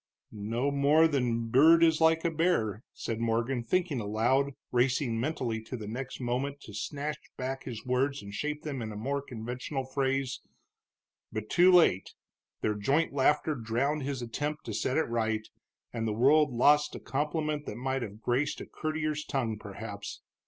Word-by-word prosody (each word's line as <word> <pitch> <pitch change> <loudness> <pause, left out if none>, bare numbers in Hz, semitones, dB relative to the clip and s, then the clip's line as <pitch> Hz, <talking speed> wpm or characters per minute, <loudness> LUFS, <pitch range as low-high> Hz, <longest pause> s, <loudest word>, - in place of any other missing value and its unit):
"No 115 +6 -1
more 145 +3 +5
than 135 -6 +1
a - - +1
bird 135 +9 +5
is 160 -1 +4
like 160 +1 +4
a 170 - +2
bear," 140 - +1
said 115 -1 -4
Morgan, 115 +2 0
thinking 165 +2 0
aloud, 120 +7 +1 0.2
racing 125 -1 +1
mentally 120 -4 -1
the 110 0 -7
next 125 +4 -5
moment 130 +3 -2
to 105 - -11
snatch 145 +8 -4 0.2
back 130 +1 -4
his 120 -3 -6
words 135 +2 0
and 100 0 -9
shape 150 +8 -3
them 140 -5 -4
in 110 - -4
more 140 +6 -2
conventional 125 +2 -5
phrase. 135 0 -1 0.9
But 110 0 -5
too 180 +2 +6
late; 165 - +4 0.5
their 105 - +1
joint 135 +10 +1
laughter 150 +3 +2
drowned 130 +5 -1
his 135 -2 -3
attempt 145 +6 -3
to 110 - -4
set 130 +6 0
it 160 - +2
right, 110 -2 -1 0.5
and 115 -1 -2
the 110 - 0
world 145 +6 +4
lost 145 +5 +4
a - - -6
compliment 150 +1 -2
that - - -4
might 130 +1 -1
have 105 -1 -7
graced 130 +4 0
a - - -6
courtier's 155 -1 -2
tongue, 115 -8 -2
perhaps. 100 0 -7
130 Hz, 165 wpm, -30 LUFS, 115-150 Hz, 0.9 s, too